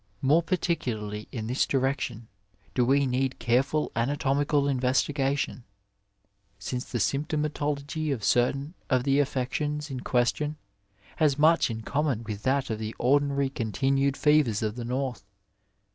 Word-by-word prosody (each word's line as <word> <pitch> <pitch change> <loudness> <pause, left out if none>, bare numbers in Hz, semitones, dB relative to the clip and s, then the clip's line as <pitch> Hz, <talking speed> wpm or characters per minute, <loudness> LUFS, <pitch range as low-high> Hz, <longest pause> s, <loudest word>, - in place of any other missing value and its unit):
More 150 +5 +5
par 170 +2 0
ticularly 110 -11 -3
in 110 -4 -4
this 125 +4 +1
direction 130 -4 -1 0.5
do 125 - +2
we 140 +3 +3
need 130 0 0
careful 135 +5 +1
anatomical 140 +3 +1
investigation, 135 +1 0 0.9
since 125 +6 -4
the 120 - -4
symptomatology 150 +3 -1
of 120 -6 -3
certain 135 - +1 0.2
of 130 -2 +2
the 140 +1 +2
affections 145 +2 -1
in 130 - -4
question 130 +5 0 0.6
has 150 -4 +3
much 160 +1 +4
in 110 -1 -4
common 140 -3 -1
with 105 -2 -5
that 135 +1 0
of 110 - -3
the 110 0 -5
ordinary 140 +1 +2
continued 135 +4 0
fevers 150 -8 +3
of 105 0 -1
the 120 -1 -5
North. 130 0 -3
135 Hz, 135 wpm, -27 LUFS, 120-145 Hz, 0.9 s, More